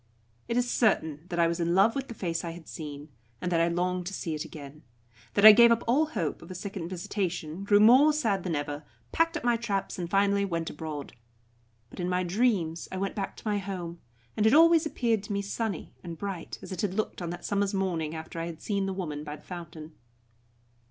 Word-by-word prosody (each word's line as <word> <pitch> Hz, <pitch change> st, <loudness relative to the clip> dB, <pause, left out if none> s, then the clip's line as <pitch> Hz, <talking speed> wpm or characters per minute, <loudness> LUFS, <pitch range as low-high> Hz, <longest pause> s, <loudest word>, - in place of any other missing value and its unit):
It 235 Hz, -, -1 dB
is 245 Hz, 0 st, +2 dB
certain 160 Hz, -, +1 dB
that 175 Hz, -, -3 dB
I 170 Hz, -, +4 dB
was 170 Hz, +1 st, -1 dB
in 170 Hz, +1 st, +1 dB
love 200 Hz, +4 st, +5 dB
with 270 Hz, -1 st, -3 dB
the 235 Hz, -, -8 dB
face 170 Hz, -4 st, -2 dB
I 170 Hz, -1 st, -4 dB
had 165 Hz, -2 st, -12 dB
seen, 150 Hz, -1 st, -8 dB, 0.3 s
and 180 Hz, -, -3 dB
that 165 Hz, -1 st, +3 dB
I 170 Hz, -, +3 dB
longed 180 Hz, +1 st, -1 dB
to 195 Hz, -, -4 dB
see 165 Hz, -, -3 dB
it 155 Hz, 0 st, -3 dB
again; 150 Hz, -2 st, -10 dB, 0.5 s
that 200 Hz, -, +5 dB
I 215 Hz, -, +14 dB
gave 235 Hz, +2 st, +7 dB
up 230 Hz, 0 st, +2 dB
all 280 Hz, +7 st, +3 dB
hope 185 Hz, -, -3 dB
of -, -, -12 dB
a 185 Hz, -, -7 dB
second 185 Hz, -2 st, -5 dB
visitation, 180 Hz, -2 st, -3 dB
grew 205 Hz, 0 st, +5 dB
more 255 Hz, +8 st, +7 dB
sad 220 Hz, -11 st, 0 dB
than 175 Hz, -4 st, -1 dB
ever, 145 Hz, 0 st, -3 dB, 0.3 s
packed 330 Hz, +1 st, +2 dB
up -, -, -7 dB
my 240 Hz, -1 st, +3 dB
traps, 205 Hz, -5 st, -3 dB
and 170 Hz, -1 st, -3 dB
finally 200 Hz, +1 st, +3 dB
went 170 Hz, -4 st, -2 dB
abroad. 150 Hz, -2 st, -6 dB, 0.8 s
But -, -, -11 dB
in 180 Hz, 0 st, -1 dB
my 180 Hz, 0 st, +1 dB
dreams 180 Hz, -4 st, 0 dB
I 190 Hz, -, -4 dB
went 195 Hz, +1 st, -2 dB
back 195 Hz, -2 st, -4 dB
to -, -, -9 dB
my 205 Hz, -1 st, +1 dB
home, 180 Hz, -3 st, -5 dB, 0.4 s
and 215 Hz, 0 st, +3 dB
it 220 Hz, -, +5 dB
always 330 Hz, 0 st, +6 dB
appeared 230 Hz, -7 st, 0 dB
to 205 Hz, -, -4 dB
me 200 Hz, 0 st, -1 dB
sunny 200 Hz, -2 st, -4 dB
and 170 Hz, -2 st, -7 dB
bright, 195 Hz, -3 st, -5 dB
as -, -, -9 dB
it 185 Hz, -, -3 dB
had 195 Hz, -3 st, -1 dB
looked 215 Hz, -3 st, -2 dB
on 170 Hz, -, -3 dB
that 175 Hz, +1 st, -6 dB
summer's 200 Hz, 0 st, 0 dB
morning 165 Hz, -5 st, -1 dB
after 160 Hz, +1 st, -7 dB
I 165 Hz, -, -3 dB
had 165 Hz, -2 st, -7 dB
seen 200 Hz, 0 st, -1 dB
the 195 Hz, -, -2 dB
woman 155 Hz, -6 st, -4 dB
by 150 Hz, 0 st, -6 dB
the 150 Hz, -, -17 dB
fountain. 165 Hz, -3 st, -9 dB
185 Hz, 230 wpm, -28 LUFS, 165-210 Hz, 0.8 s, I